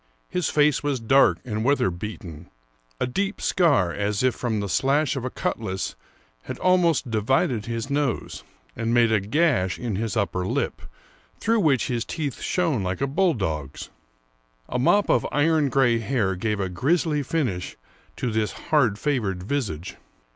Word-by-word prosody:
His 180 -3 0
face 150 -1 +3
was 145 -3 -1
dark 115 -6 +4
and 110 -2 -3
weather 135 -7 +2
beaten; 85 -3 -8 0.5
a - - +1
deep 195 +10 -2
scar, 140 - +2
as 100 +3 -1
if 130 -1 +3
from 115 -4 -2
the 100 - -2
slash 135 - +1
of 130 - -4
a 130 - -2
cutlass, 95 -6 -3 0.5
had - - -5
almost 175 -8 +2
divided 115 - +1
his 115 +1 -3
nose, 140 -3 -2 0.3
and 115 +1 -1
made 115 -1 +4
a 110 - +4
gash 105 - +1
in 115 -6 -3
his 115 +1 -2
upper 95 -3 0
lip, - - -2 0.6
through 225 +1 +2
which 145 - +2
his 120 -3 -1
teeth 150 -3 -4
shone 165 - 0
like 90 0 -2
a 135 - +1
bulldog's. 105 - -1 0.8
A 125 - -2
mop 205 +11 +3
of - - +3
iron 150 -1 +2
gray 120 -4 +3
hair 110 -5 0
gave 105 +2 -2
a 95 - 0
grisly 150 - +1
finish 130 - -2 0.4
to 125 - -2
this 110 -1 -1
hard 125 -10 +1
favored 105 -10 -1
visage. 100 - -3
120 Hz, 160 wpm, -24 LUFS, 100-145 Hz, 0.8 s, dark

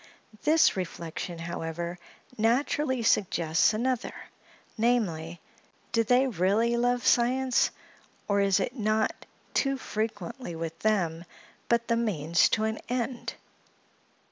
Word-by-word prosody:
This 310 -3 +4
reflection, 170 -1 -5
however, 170 +1 -4 0.4
naturally 255 +3 +1
suggests 170 -6 +3
another, 245 +3 -1 0.6
namely, 180 -9 0 0.5
do 230 - +3
they 250 +4 +4
really 220 +2 +1
love 245 0 +1
science, 255 +1 +3 0.6
or 200 -1 +2
is 195 -1 +3
it - - -2
not 215 -2 0 0.3
too 275 -1 +1
frequently 215 -3 -4
with 165 0 -5
them 175 -7 0 0.5
but 235 0 +2
the 230 - +2
means 170 -8 +2
to 215 - +1
an 220 0 -1
end? 245 0 -3
220 Hz, 110 wpm, -28 LUFS, 175-245 Hz, 0.6 s, This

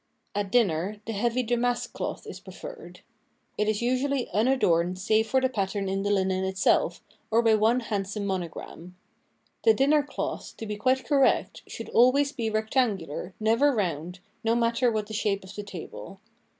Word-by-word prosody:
At 200 -1 -2
dinner, 205 -3 +1
the 225 - -4
heavy 240 +4 0
damask 240 +1 0
cloth - - -4
is - - -8
pre - - -12
ferred. - - -10 0.5
It 210 - 0
is 215 +1 -1
usually 255 +1 0
un 215 +6 +2
adorned 180 -9 +2
save 215 +3 +2
for 265 - +3
the 260 - +2
pat 200 -7 -1
tern 195 0 -3
in 195 +1 -1
the 205 - -1
linen 190 -2 +1
itself 190 -2 +1 0.3
or 230 +2 +3
by 225 -1 +5
one 220 +4 +3
handsome 205 -2 -3
mono 190 -3 -1
gram. 175 +2 -10 0.7
The 445 - +6
dinner 290 +3 +4
cloth, 290 - -5
to 225 - -6
be 210 -1 -4
quite 255 +5 +1
correct, 275 -3 +2
should - - -7
always 275 +4 +4
be 230 -5 -2
rectangular, 215 - -1
never 230 +7 +3
round, 180 -2 -2 0.2
no 225 +1 +2
matter 235 +1 +2
what 215 -1 -1
the 220 - -9
shape 205 -2 0
of 190 +1 -11
the 210 - -5
table. 195 0 -9
215 Hz, 180 wpm, -27 LUFS, 195-245 Hz, 0.7 s, The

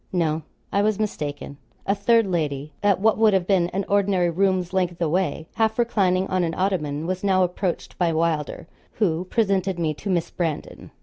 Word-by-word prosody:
No; 160 -3 0 0.3
I 200 - +2
was 210 -1 +1
mistaken. 145 -9 -4 0.3
A 200 - +2
third 225 +3 +3
lady, 150 -5 -2
at 200 -2 +3
what 220 +2 +2
would 220 -2 +5
have 185 -2 +1
been 180 -3 +2
an 195 +2 -2
ordinary 195 -3 +2
room's 185 0 +1
length 180 -2 0
away, 165 -2 0
half 220 -1 +1
reclining 195 -6 +2
on 185 -1 0
an 165 -1 -2
ottoman, 160 -6 -1
was 185 +2 -3
now 190 -2 +3
approached 180 0 -2
by 175 -2 +2
Wylder, 160 -2 -1 0.3
who 180 -4 0
presented 195 -3 0
me 160 -3 0
to 195 +7 -7
Miss 175 -3 0
Brandon. 165 -4 -4
185 Hz, 180 wpm, -23 LUFS, 165-200 Hz, 0.3 s, would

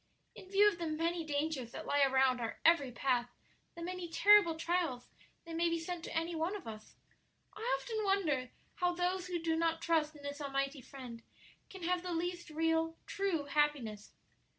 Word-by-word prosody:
"In 370 - -12
view 400 +1 +6
of 405 -5 +1
the 335 - -2
many 330 +2 -1
dangers 290 -5 -2
that - - -6
lie 285 0 +2
around 265 -2 +4
our 225 - -4
every 305 -6 +5
path, 245 0 0 0.5
the 340 - -7
many 360 0 -4
terrible 405 -1 +6
trials 325 -6 -1 0.4
that 330 -1 -6
may 335 +1 +2
be 335 - 0
sent 335 +1 -5
to - - -3
any 330 +1 -1
one 330 +5 -1
of 405 - -7
us, 215 -1 -9 0.6
I 425 - -10 0.2
often 445 -3 -3
wonder 320 -11 +1 0.3
how 355 0 +1
those 360 +1 -1
who 355 -1 -1
do 325 -1 0
not 330 0 +1
trust 315 -2 +1
in 290 - -13
this 285 +1 -5
almighty 275 0 -2
Friend 250 -3 -9 0.5
can 380 -2 -10
have 360 +1 +1
the 360 -1 -4
least 345 +1 -3
real, 325 +1 +1
true 390 -6 -1
happiness. 280 -8 0
325 Hz, 185 wpm, -34 LUFS, 280-350 Hz, 0.6 s, view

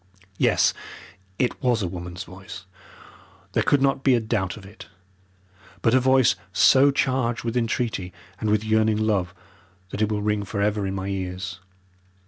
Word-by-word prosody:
Yes, - - +3 0.6
it 125 - -1
was 120 -5 +1
a - - -1
woman's 90 +1 -6
voice; 95 0 -11 0.9
there - - +2
could 140 -1 +2
not 135 -1 +1
be 130 -2 +5
a - - +2
doubt 110 -4 -2
of 100 - -12
it. 105 +3 -13 1.0
But 115 - +3
a 130 - +6
voice 130 -1 +4 0.2
so 135 +1 +6
charged 130 -3 0
with 115 0 -3
entreaty 115 -5 -1 0.3
and 110 - -1
with 105 0 +2
yearning 110 0 +2
love, 105 -5 0 0.6
that 105 - -4
it 110 0 +1
will 105 -1 -1
ring 105 -1 0
for 100 +1 -5
ever 100 -1 0
in 95 - -3
my 95 0 -4
ears. 95 -1 -4
110 Hz, 165 wpm, -24 LUFS, 95-120 Hz, 1.0 s, a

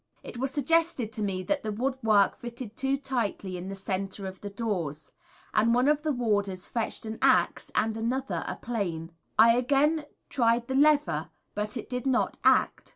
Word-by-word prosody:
It 235 - -8
was 270 +1 0
suggested 285 -4 +1
to 215 - -5
me 190 -2 -1
that 290 +8 0
the 215 - -3
woodwork 225 -4 +2
fitted 240 -2 -7
too 270 +1 0
tightly 230 -8 -2
in 180 +2 -6
the 195 - -5
centre 195 +1 -4
of 190 0 -7
the 205 - -5
doors, 180 -9 -3 0.4
and 225 +2 +3
one 250 +2 +3
of 300 0 +3
the 310 0 0
warders 205 -7 0
fetched 230 -1 -3
an 220 0 -5
axe - - +3
and 220 0 +1
another 255 +4 -2
a - - -3
plane. 175 -8 -3 0.3
I 230 +1 +7
again 285 +5 +2 0.2
tried 235 -1 +2
the 265 - -2
lever 295 +2 +3 0.2
but 210 +2 -3
it 230 - -6
did 250 +1 -3
not 255 -1 +1
act. - - +3
230 Hz, 180 wpm, -28 LUFS, 200-265 Hz, 0.4 s, I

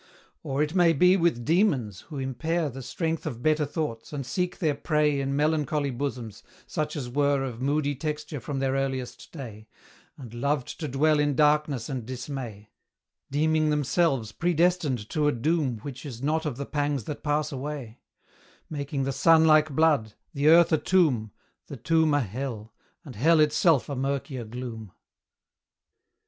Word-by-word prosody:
Or, 140 +2 -1
it 155 +1 -3
may 175 -3 +4
be, 180 +5 +5
with 165 -10 +1
demons, 145 - +1
who 150 - -6
impair 145 +4 -1
The 135 +2 -8
strength 160 +5 -3
of 120 0 -6
better 155 -1 +2
thoughts, 145 -7 -4
and 140 -3 -4
seek 180 +6 -2
their 155 -5 +1
prey 150 -1 +1
In 135 0 -2
melancholy 150 -1 0
bosoms, 120 -5 -5 0.2
such 155 -2 -3
as 140 -5 -4
were 140 +2 +1
Of 125 -3 -5
moody 145 +1 +1
texture 150 +1 -4
from 140 +3 -5
their 135 0 0
earliest 135 -2 -3
day, 110 -8 -9 0.5
And 120 -5 -10
loved 140 +2 -2
to 155 - -3
dwell 150 +3 +2
in 145 -1 +1
darkness 150 -4 +2
and 130 -4 -4
dismay, 120 -4 -7 0.6
Deeming 155 +2 +2
themselves 140 - +1
predestined 170 - +1
to 150 -1 +1
a - - +4
doom 140 0 0
Which 135 -3 -7
is 130 -4 -8
not 155 +2 0
of 130 -5 -4
the 140 - -4
pangs 145 -3 -1
that 145 - -6
pass 150 0 0
away; 135 -4 -6 0.7
Making 140 -2 -3
the 135 - -1
sun 160 +4 +5
like 155 0 +5
blood, 140 -8 +2 0.2
the 145 0 0
earth 170 +2 +7
a 155 - +4
tomb, 150 - +2 0.4
The 140 - -8
tomb 155 +5 +2
a 145 - +3
hell, 115 -1 -5 0.3
and 135 -5 -10
hell 160 +9 +4
itself 150 -1 +3
a 140 - -4
murkier 135 -1 -3
gloom. 115 -4 -7
145 Hz, 165 wpm, -26 LUFS, 130-155 Hz, 0.7 s, earth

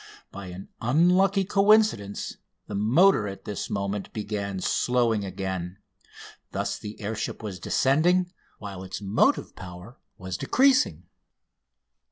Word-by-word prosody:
By 100 -1 -8
an 90 +2 -9
unlucky 180 - +3
coincidence 200 - +2 0.3
the - - -8
motor 110 - +4
at 100 0 -8
this 105 - -4
moment 100 0 -3
began 100 -2 -3
slowing 115 0 +1
again. 95 -1 -4 0.8
Thus - - -2
the 105 +1 -8
air 105 +1 -3
ship 110 - -4
was 100 -4 -5
descending, 175 - +2 0.3
while 100 -3 -7
its 95 0 -6
motive 100 +1 +1
power 90 +5 -10 0.2
was 95 -1 -5
decreasing. 270 - +3
105 Hz, 120 wpm, -26 LUFS, -, 0.8 s, motor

